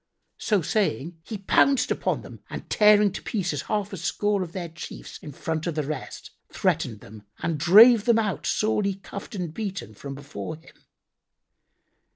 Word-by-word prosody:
So 205 -6 +1
saying, 165 - -1
he 210 +6 -6
pounced 260 +7 +3
upon - - -1
them - - -11
and - - -7
tearing 210 -1 +5
to 190 - -6
pieces 180 - -2
half 205 -2 -1
a - - -4
score 205 +4 0
of 175 -3 -4
their 175 -1 -5
chiefs 160 - -9
in 150 - -9
front 160 +4 -3
of 170 - -2
the 155 - 0
rest, 150 +2 -6 0.2
threatened 110 -3 -1
them 110 +1 -12 0.2
and 160 -3 -1
drave 215 - +8
them 235 -2 +4
out, 210 -4 -1
sorely 210 -2 +1
cuffed 200 +1 -9
and 175 -5 -4
beaten, 195 - -5
from 135 +6 -8
before 145 +3 -7
him. 160 - -20
185 Hz, 170 wpm, -25 LUFS, 155-210 Hz, 0.2 s, drave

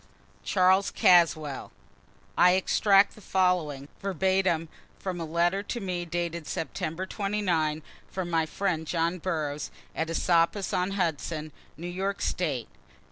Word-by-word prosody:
CHARLES 190 +1 +3
CASWELL. 155 -5 +3 0.6
[I 180 0 +6
extract 195 +1 +4
the 215 - -15
following, 180 -8 0
verbatim, 190 -3 +1 0.3
from 180 -3 -4
a - - -2
letter 170 +4 +1
to 235 +4 -4
me 180 -3 -3
dated 170 -1 -3
September 165 +2 -3
29, 185 -7 -1 0.3
from 185 -2 -4
my 165 -1 +2
friend 165 -2 -2
John 170 +2 0
Burroughs, 155 -4 -2 0.3
at 160 0 -1
Esopus 170 +3 +1
on 180 +2 0
Hudson, 160 -3 -2 0.3
New 170 - -7
York 190 +3 -2
State. 145 -9 -1
175 Hz, 125 wpm, -28 LUFS, 160-190 Hz, 0.6 s, I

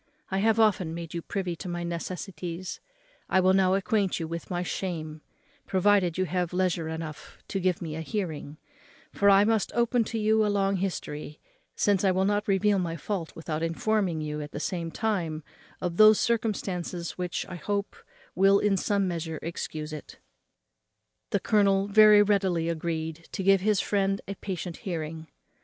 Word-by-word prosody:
I 190 - +1
have 220 +2 +3
often 190 -7 +2
made 170 -2 -7
you 170 - -3
privy 180 -1 -3
to 185 - -6
my 175 0 -3
necessities, 175 0 -5 0.5
I 190 - +4
will 185 0 +4
now 190 -1 +4
acquaint 195 0 0
you 165 - -3
with 170 0 -6
my 175 -1 -1
shame, 160 -5 -4 0.5
provided 190 -3 +3
you 185 - +1
have 180 0 -2
leisure 180 -3 0
enough 160 -1 -7
to 195 - -1
give 180 -2 0
me 155 -2 -4
a 160 - -4
hearing: 160 -6 -4 0.6
for 200 - +4
I 195 0 +7
must 220 -1 +1
open 235 0 +2
to 225 - -4
you 220 0 +3
a - - +2
long 195 -1 +1
history, 150 -5 -4 0.4
since 205 -2 +2
I 195 - +4
will 190 +1 +2
not 205 +1 0
reveal 200 0 +3
my 170 -2 -2
fault 175 0 -4
without 160 -1 -4
informing 170 0 0
you, 150 0 -3
at 150 - -8
the - - -4
same 170 0 -3
time, 170 -7 -2 0.4
of 175 -2 -3
those 215 0 +8
circumstances 190 -6 -1
which, 180 -1 -2
I 180 -2 -7
hope, 200 +4 -2 0.4
will 195 +2 +5
in 200 -1 +2
some 200 0 +1
measure 165 -2 -3
excuse 155 -2 -5
it." 150 - -9 1.1
The 200 - +1
colonel 200 -1 +3
very 210 0 +7
readily 190 -5 +1
agreed 160 0 -3
to 190 - -3
give 195 0 +5
his 210 0 +2
friend 195 -1 +1
a 200 - -3
patient 185 -3 -5
hearing. 160 -3 -5
185 Hz, 175 wpm, -27 LUFS, 165-200 Hz, 1.1 s, those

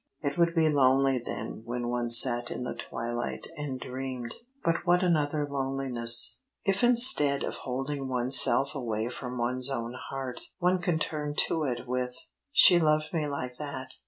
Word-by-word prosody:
It 140 -1 -2
would 170 0 +2
be 160 -1 +3
lonely 135 -2 +3
then 120 - -6
when 120 +1 -4
one 120 -1 -2
sat 120 0 +3
in - - -5
the 125 - -4
twilight 120 +1 -5
and 140 -3 -5
dreamed 130 -2 -6 0.3
but 165 0 +1
what 175 +1 +2
another 150 -4 +1
loneliness! 135 -4 +1 0.2
If 195 +3 0
instead 235 - +5
of - - -3
holding 135 +2 -4
one's 130 +1 +5
self 140 +2 +3
away 115 -5 -3
from 125 0 -7
one's 125 +2 0
own 120 -3 -4 0.2
heart, 135 -2 -5 0.2
one 180 +1 +1
could 175 -3 -1
turn 150 -1 -3
to 160 -2 -2
it 125 -2 -4
with: 125 0 -3 0.4
"She 180 -10 +7
loved 155 0 +1
me 155 -3 -1
like 130 -3 -5
that. 140 -3 -6
135 Hz, 165 wpm, -28 LUFS, 125-150 Hz, 0.4 s, She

